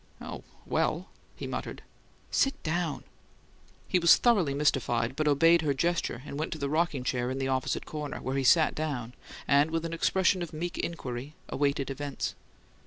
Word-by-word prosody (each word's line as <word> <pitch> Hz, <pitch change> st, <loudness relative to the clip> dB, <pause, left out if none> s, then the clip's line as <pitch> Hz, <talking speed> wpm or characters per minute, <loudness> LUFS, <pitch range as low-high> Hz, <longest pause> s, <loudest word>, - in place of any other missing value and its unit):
"Oh, -, -, -7 dB, 0.2 s
well -, -, 0 dB
" -, -, -33 dB
he -, -, -5 dB
muttered. -, -, -5 dB, 0.5 s
"Sit 275 Hz, +1 st, +2 dB
down!" 165 Hz, -1 st, -1 dB, 0.8 s
He 180 Hz, -, +2 dB
was 170 Hz, 0 st, +8 dB
thoroughly 195 Hz, -, +3 dB
mystified, 130 Hz, -4 st, +1 dB
but 155 Hz, +1 st, 0 dB
obeyed 165 Hz, +4 st, +5 dB
her 145 Hz, -3 st, 0 dB
gesture 165 Hz, -4 st, -1 dB
and 140 Hz, -, -6 dB
went 155 Hz, -, -2 dB
to -, -, -6 dB
the 140 Hz, -2 st, -2 dB
rocking 155 Hz, -4 st, +1 dB
chair 125 Hz, -1 st, -1 dB
in 130 Hz, -, -3 dB
the 135 Hz, 0 st, -1 dB
opposite 130 Hz, -1 st, -1 dB
corner, 150 Hz, -2 st, -5 dB
where 130 Hz, +2 st, -3 dB
he 135 Hz, -, +1 dB
sat 155 Hz, +4 st, +5 dB
down, 135 Hz, -7 st, -3 dB, 0.3 s
and, 145 Hz, +2 st, +4 dB
with 165 Hz, 0 st, -2 dB
an 165 Hz, -, -4 dB
expression 185 Hz, +2 st, +2 dB
of 170 Hz, -2 st, -5 dB
meek 170 Hz, +3 st, -4 dB
inquiry, 135 Hz, -3 st, -4 dB
awaited 140 Hz, -1 st, 0 dB
events. 140 Hz, 0 st, -3 dB
150 Hz, 175 wpm, -29 LUFS, 135-165 Hz, 0.8 s, was